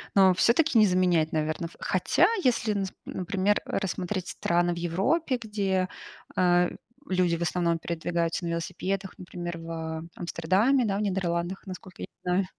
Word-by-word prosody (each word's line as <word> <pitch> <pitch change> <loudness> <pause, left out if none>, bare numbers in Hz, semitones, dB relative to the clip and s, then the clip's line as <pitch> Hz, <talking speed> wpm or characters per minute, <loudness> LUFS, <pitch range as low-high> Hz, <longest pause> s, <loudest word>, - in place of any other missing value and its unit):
но 190 -1 +7
все-таки 240 - +3
не 215 - +7
заменяет, 180 -4 +2
наверно 155 +2 -1
в - - -17
хотя, - - +3 0.2
если, 230 -3 +2
нас 195 -2 -2
например, 195 +2 0
рассмотреть 185 -1 -2
страны 175 0 +1
в - - -7
Европе, 195 - 0
где, 195 -4 0 0.5
а, 175 -1 +4 0.4
люди 180 -2 +2
в - - -9
основном 170 -1 +1
передвигаются 170 +1 -2
на - - -2
велосипедах, 185 +3 -3
например, 175 -1 -6
в 160 0 -5
Амстердаме, 190 +10 +2
да, 195 -2 0
в - - -1
Нидерландах, 185 -1 -1
насколько 185 -1 -9
я - - -5
не - - -56
знаю. 180 +2 +1
180 Hz, 155 wpm, -27 LUFS, 170-195 Hz, 0.5 s, но